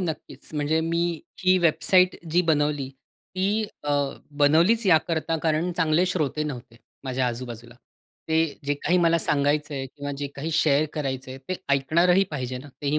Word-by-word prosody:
नक्कीच 165 -4 -6
म्हणजे 150 +2 +1
मी 170 0 -1 0.2
ही 185 0 +5
वेबसाईट 180 +2 +3
जी 175 - +4
बनवली, 150 -4 +1
ती 190 +9 -3 0.2
अ, 145 - -1 0.5
बनवलीच 170 +10 +4
याकरता 165 -1 +2
कारण 160 +2 +1
चांगले 165 +1 +3
श्रोते 155 -4 -1
नव्हते, 125 -5 -7 0.3
माझ्या 130 -1 -1
आजू-बाजूला. 120 -1 -6 0.5
ते 160 +1 +3 0.2
जे 145 +1 0
काही 175 +5 0
मला 170 -1 +3
सांगायचं 145 0 +1
आहे 135 -1 -3
किंवा 145 +1 -7
जे 145 - -2
काही 155 +4 -4
शेअर 155 -2 +3
करायचं 130 -3 -4
आहे 130 - -8
ते 185 - -1 0.2
ऐकणारही 170 +7 +3
पाहिजे 130 -3 -4
ना, 145 +3 -11
तेही 145 +2 +1
155 Hz, 155 wpm, -25 LUFS, 140-170 Hz, 0.5 s, ही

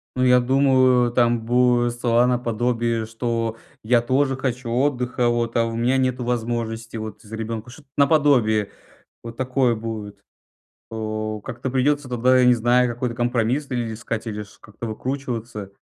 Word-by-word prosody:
Ну, 130 0 +1
я 125 0 +5
думаю, 130 -1 +3
там 120 -1 +2
будут 120 0 +3
слова 120 0 +3
наподобие: 120 -1 0
"Что 115 0 -2 0.3
я 120 +2 +3
тоже 135 +3 +1
хочу 130 -2 -3
отдыха, 125 -1 0
вот, 120 -1 -1
а 115 - +3
у 115 0 -4
меня 120 +3 +1
нету 130 -1 0
возможности 115 -1 -3
вот 110 -1 -7
за 110 0 -14
ребенку". 115 +1 -5
Что-то 145 +4 -14
наподобие 140 -8 +3 0.5
вот 115 0 -9
такое 130 -1 +1
будет, 110 -2 -6 0.7
о. 110 -1 -4
Как-то 120 +2 -5
придется 145 +2 +1
тогда, 125 +1 +3
я 125 - +5
не 125 - +6
знаю, 120 +2 +3
какой-то 120 0 -3
компромисс 120 +3 0
или 120 -3 -2
искать, 115 +1 -5
или 105 -1 -4
ш 100 - -18
как-то 105 +2 -9
выкручиваться. 115 -3 -5
120 Hz, 155 wpm, -22 LUFS, 115-125 Hz, 0.7 s, не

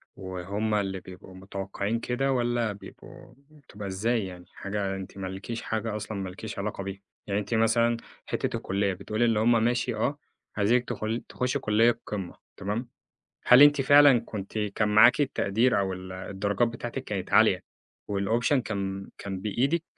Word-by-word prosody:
وهُم 95 +4 -3
اللي 95 -2 0
بيبقوا 95 0 -12
متوقعين 100 +3 -3
كده 135 +3 -1
والّا 120 -3 +1
بيبقوا 105 +4 -12 0.2
بتبقى 125 -9 -10
إزاي 110 +3 0
يعني؟ 90 -1 -9
حاجة 100 -1 -3
أنتِ 95 0 -8
مالكيش 95 +4 -5
حاجة 110 -1 -2
أصلًا 105 0 -5
مالكيش 95 +2 -6
علاقة 100 -1 -3
بيها.يعني 100 +1 -5
أنتِ 105 +3 -4
مثلًا 115 +1 +3 0.3
حتّة - - -2
الكلية 100 0 -1
بتقول 105 +5 -2
اللي 115 -2 +3
هُم 115 0 +4
ماشي 120 0 +1
آه 145 +2 -1 0.4
عايزينك 120 +4 +3
تخل 115 0 -2
تخشّي 130 +3 -1
كلية 115 +1 +3
قمّة، 95 -4 -5 0.2
تمام، 105 +5 -3 0.6
هل 125 +2 +8
أنتِ 145 -1 +7
فعلًا 140 -2 +7
كنتِ 105 0 -6
كان 105 0 0
معاكِ 115 +7 +6
التقدير 115 -4 +2
أو 95 -1 -1
ال 95 0 -8
الدرجات 100 +4 -1
بتاعتِك 120 +2 -5
كانت 100 -6 -4
عالية - - +5 0.5
والoption 110 +6 +1
كان 100 -4 -3
كان 95 -1 -5
بإيدك؟ 135 - 0
105 Hz, 150 wpm, -27 LUFS, 100-120 Hz, 0.6 s, هل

